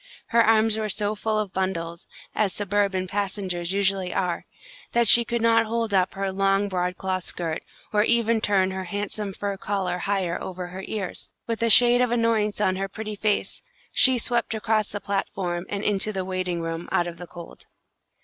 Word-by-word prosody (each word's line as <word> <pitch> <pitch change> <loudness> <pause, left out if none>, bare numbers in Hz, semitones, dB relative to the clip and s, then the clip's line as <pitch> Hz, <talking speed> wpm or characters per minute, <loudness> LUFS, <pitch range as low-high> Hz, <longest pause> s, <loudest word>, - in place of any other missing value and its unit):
Her 230 0 +5
arms 220 0 +3
were 215 -1 -2
so 210 +1 0
full 215 0 -1
of 210 -3 -2
bundles, 170 -3 -3 0.3
as 205 -4 +1
suburban 200 -2 0
passengers' 190 -3 -2
usually 195 -2 +1
are, 180 -2 -1 0.5
that 235 -1 +3
she 235 +3 +8
could 235 0 -2
not 230 -1 +4
hold 230 -1 -1
up 185 -1 +2
her 195 0 -2
long 195 +1 +2
broadcloth 185 0 -2
skirt, 165 -3 -4 0.3
or 210 - +4
even 230 -1 +2
turn 190 -3 +2
her 190 0 -4
handsome 205 +2 -3
fur 200 +1 -4
collar 190 -3 -2
higher 190 -3 -1
over 185 -1 -5
her 190 +2 -7
ears. 200 -4 -5 0.2
With 230 -1 -3
a 230 - +2
shade 245 +2 +7
of 250 - +2
annoyance 230 -3 +1
on 185 -3 +1
her 195 0 -2
pretty 215 +1 -6
face, 210 0 -1 0.3
she 260 -1 +5
swept 235 -1 0
across 220 -1 0
the 205 - -3
platform 185 -3 -3
and 200 0 -3
into 210 +1 +1
the 190 -3 -3
waiting 185 -2 -2
room, 165 +1 -4
out 175 - +2
of 170 -1 -7
the 175 - -8
cold. 170 -1 -11
200 Hz, 185 wpm, -25 LUFS, 185-215 Hz, 0.5 s, she